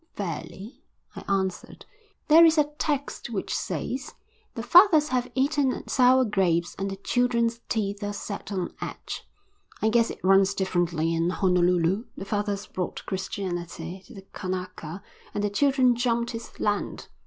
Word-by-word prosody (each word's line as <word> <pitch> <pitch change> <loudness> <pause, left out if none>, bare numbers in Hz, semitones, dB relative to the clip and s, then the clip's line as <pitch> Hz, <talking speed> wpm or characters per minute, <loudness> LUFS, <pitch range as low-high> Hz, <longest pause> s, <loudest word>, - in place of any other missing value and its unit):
"Fairly," 195 - -6 0.3
I - - -7
answered. 190 -2 -2 0.4
"There 320 +2 +8
is 325 -1 +6
a 295 -1 +2
text 285 -4 -2
which 210 -5 -3
says: 250 - -4 0.4
The 230 - -4
fathers 320 - +6
have 250 -1 0
eaten 275 0 +1
sour 255 0 +4
grapes 175 -5 +1
and 195 0 -1
the 195 - -4
children's 235 +2 0
teeth 205 -2 -1
are 205 - -2
set 205 0 -6
on 185 -3 -3
edge. - - -6 0.5
I 220 - +2
guess 230 0 +3
it - - -6
runs 195 +1 +4
differently 175 -3 0
in 165 +1 +1
Honolulu. 180 +2 +2
The 195 - -6
fathers 205 -1 -2
brought 180 -1 -5
Christianity 180 -2 -4
to 250 - -13
the 195 -1 -11
Kanaka 185 -2 -5 0.3
and 205 - -1
the 205 - 0
children 260 +1 +3
jumped 235 0 0
his 230 -1 -8
land." 205 -1 -2
205 Hz, 150 wpm, -26 LUFS, 185-245 Hz, 0.5 s, There